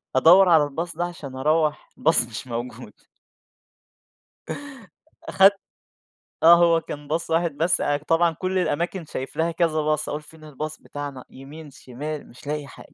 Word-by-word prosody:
أدَوَّر 175 +7 +7
على 160 -3 +6
الباص 165 +3 -4
ده 175 - 0
عشان 150 -7 -8
أرّوح 155 +2 0
الباص 160 -6 +3
مش 120 +3 -8
موجود 120 +1 -6 2.4
أخدت 195 +1 +5 0.9
آه، 170 +1 +9
هو 170 -1 +4
كان 145 -1 -8
باص 160 +3 -2
واحد 165 -2 0
بس 170 +2 +1 0.3
طبعًا 165 +1 +3
كل 185 +3 -3
الأماكن 175 +1 -2
شايف 135 -2 -7
لها 165 +1 +1
كذا 165 -2 0
باص، 150 0 -1
أقول 150 +1 -4
فين 155 +1 -16
الباص 155 +1 -6
بتاعنا؟ 145 -3 -7
يمين 145 +3 -12
شمال 145 +4 -7
مش 130 +4 -15
لاقي 150 -1 -3
حاجة. - - -15
155 Hz, 150 wpm, -23 LUFS, 145-170 Hz, 2.4 s, آه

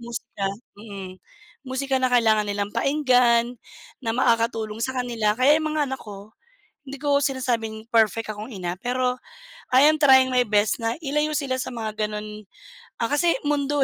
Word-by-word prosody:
musika. 235 -4 -5 0.3
Mm. 195 -3 -9 0.5
Musika 265 +1 -1
na 255 - +2
kailangan 220 -4 +3
nilang 205 0 -3
pakinggan, 250 -4 +2 0.4
na 225 -3 -2
makakatulong 230 -3 0
sa 260 +3 -2
kanila. 230 -4 0
Kaya 285 +5 +4
'yong 310 - -2
mga 305 - +2
anak 265 - -4
ko, 205 0 -11 0.5
hindi 275 0 -8
ko 285 -1 +2
sinasabing 235 -5 -2
perfect 225 -1 +2
akong 215 +3 -7
ina, 180 -3 -4
pero 250 +4 -1 0.5
I 260 +3 +6
am 310 0 +3
trying 260 -2 +6
my 250 - +4
best 210 +3 +1
na 225 +3 -1
ilayo 300 0 -1
sila 260 -3 -2
sa - - -6
mga 220 -2 -4
gano'n, 210 0 -7 0.6
ah, - - +1
kasi 335 +4 +2
mundo, 290 -1 +1
240 Hz, 160 wpm, -23 LUFS, 215-265 Hz, 0.6 s, I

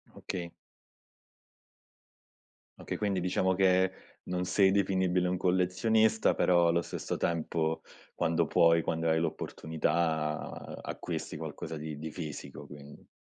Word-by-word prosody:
Okay. 85 -2 -5 2.3
Okay, - - -4
quindi 100 -3 0
diciamo 95 +1 +1
che 95 0 +4 0.3
non 90 0 -2
sei 95 +1 +4
definibile 95 -2 +2
un 90 - 0
collezionista, 95 +5 +2
però 85 -1 +4
allo 85 0 +2
stesso - - -4
tempo, 80 -1 -1 0.3
quando 85 -1 +1
puoi, 85 -1 +4
quando 80 0 -1
hai 80 - +3
l'opportunità, 80 -1 -2
acquisti - - -5
qualcosa 80 - -6
di 75 -1 -6
di 80 +1 -6
fisico, 75 -4 -7
quindi. 70 0 -13
85 Hz, 115 wpm, -30 LUFS, 80-95 Hz, 2.3 s, che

